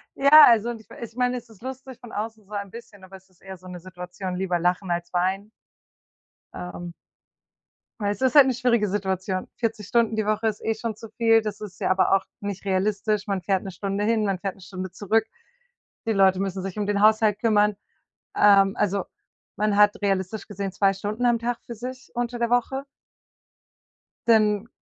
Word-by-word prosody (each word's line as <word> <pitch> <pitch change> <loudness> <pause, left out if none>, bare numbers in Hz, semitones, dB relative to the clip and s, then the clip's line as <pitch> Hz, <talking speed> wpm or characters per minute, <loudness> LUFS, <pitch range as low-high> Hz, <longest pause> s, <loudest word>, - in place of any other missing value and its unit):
Ja, 295 +2 +9
also 230 -1 +4
und 230 -2 -8
ich - - -25
ich 230 -2 -9
meine 250 0 0
es 245 - -10
ist 215 -2 -18
lustig 260 -1 -8
von 240 -2 -12
außen 220 +1 -5
so 200 - -25
ein 200 -1 -4
bisschen, 210 -4 -12
aber 185 +1 -12
es 190 0 -25
ist 185 - -30
eher 190 0 -9
so 185 +1 -15
'ne 180 -1 -8
Situation, 180 +1 -7
lieber 180 -1 -1
lachen 180 +2 0
als 175 +1 -3
weinen. 190 +4 -1 1.0
Ähm 175 -1 -7 1.1
Weil 205 -1 0
es 205 - -6
ist 260 +1 +2
halt 285 - +9
'ne 260 - +1
schwierige 235 -3 +1
Situation. 190 -1 -2
40 225 -4 -3
Stunden 230 -2 +2
die 215 -1 -1
Woche 215 +1 0
ist 215 -1 -3
eh 225 - 0
schon 220 0 -4
zu 225 +1 -11
viel, 225 -1 +4
das 215 -1 -6
ist 205 -3 -9
ja - - 0
aber 190 +1 +3
auch 195 - 0 0.2
nicht 200 -2 -5
realistisch. 200 +1 0
Man 195 -2 -2
fährt 190 +1 0
1 195 - -6
Stunde 195 +2 -3
hin, 220 -1 +2
man 195 -2 0
fährt 195 0 -4
1 195 - -18
Stunde 185 0 -7
zurück. 215 +4 0 0.8
Die 225 - +2
Leute 190 -2 +4
müssen 195 -1 -3
sich 195 +2 -5
um 205 - -1
den 200 -1 0
Haushalt 215 -1 +4
kümmern. 210 -2 +3 0.6
Ähm, 195 -1 +5
also 200 -2 0 0.5
man 210 0 +1
hat 205 0 +5
realistisch 195 +1 -1
gesehen 200 -2 -5
2 195 +1 +2
Stunden 205 +5 -4
am 240 -1 +3
Tag 235 +1 -2
für 235 - -7
sich 255 +2 -8
unter 240 0 -2
der 235 0 0
Woche. 255 +3 0 1.4
Dann 215 -1 +3
205 Hz, 200 wpm, -24 LUFS, 190-225 Hz, 1.4 s, Ja